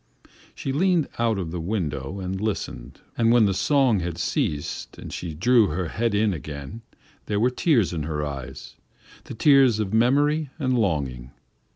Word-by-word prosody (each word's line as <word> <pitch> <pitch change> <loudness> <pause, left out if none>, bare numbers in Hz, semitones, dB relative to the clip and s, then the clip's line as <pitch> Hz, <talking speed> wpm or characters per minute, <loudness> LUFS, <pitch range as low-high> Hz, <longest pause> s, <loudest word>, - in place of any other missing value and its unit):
She 135 - -4
leaned 175 0 +2
out 115 -2 +1
of 85 -4 -4
the 90 -1 -4
window 85 -3 -3
and 95 +1 -4
listened 70 - -4 0.2
and 115 0 +4
when 120 -2 +5
the 100 - +1
song 130 0 +2
had 85 -1 -4
ceased 75 -3 -2
and - - -9
she 85 -3 -5
drew 115 +5 +4
her 90 0 -3
head 115 +2 -1
in 105 -1 +2
again, 75 +6 -7 0.5
there 105 -1 0
were 125 +3 +3
tears 125 - +2
in 80 - -2
her 75 0 -3
eyes 70 -4 -8 0.5
the - - -8
tears 135 -3 +5
of 105 -1 -2
memory 145 +6 +2
and 130 -5 0
longing. 70 - -1
100 Hz, 170 wpm, -24 LUFS, 80-125 Hz, 0.5 s, when